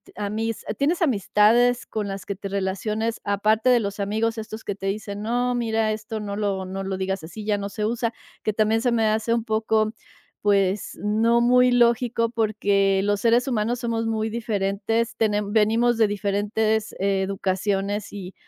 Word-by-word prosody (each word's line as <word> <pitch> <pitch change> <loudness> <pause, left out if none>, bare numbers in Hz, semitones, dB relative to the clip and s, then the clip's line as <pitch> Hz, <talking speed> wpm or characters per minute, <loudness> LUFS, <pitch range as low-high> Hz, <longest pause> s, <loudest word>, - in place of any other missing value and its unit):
amis 215 +2 -3
tienes 330 +6 +1
amistades 240 - +3
con 215 -2 -4
las 195 -1 -6
que 200 - -4
te 195 +1 -7
relaciones 210 +4 -2
aparte 215 +4 +2
de 245 -1 +5
los 200 -2 -4
amigos?, 220 +3 -1
estos 220 0 -7
que 205 - -3
te 195 0 -5
dicen: 200 0 -4
"No, 245 +3 0
mira 225 -2 0
esto 215 0 -5
no 205 -1 -4
lo 200 -2 -1
no 190 +1 -5
lo 190 0 -3
digas 190 -1 -2
así 205 +6 -8
ya 210 -1 +1
no 200 0 -4
se 210 +1 -3
usa", 230 +1 -1 0.3
que 215 - +1
también 220 +1 +2
se 245 - +1
me 225 -1 +2
hace 220 +2 0
un 230 - -1
poco, 220 -1 +1 0.5
pues, 200 -1 +1
no 225 +3 +3
muy 250 +1 +5
lógico, 235 -1 +2
porque 200 -4 +1
los 205 0 +1
seres 235 +4 +3
humanos 235 0 0
somos 230 -1 -1
muy 220 0 -1
diferentes, 220 0 -1
tenem 210 -2 0
venimos 225 +2 +3
de 220 -1 +4
diferentes 210 +2 -1
educaciones, 195 +1 -1
y 190 -2 -7
215 Hz, 170 wpm, -24 LUFS, 200-230 Hz, 0.5 s, de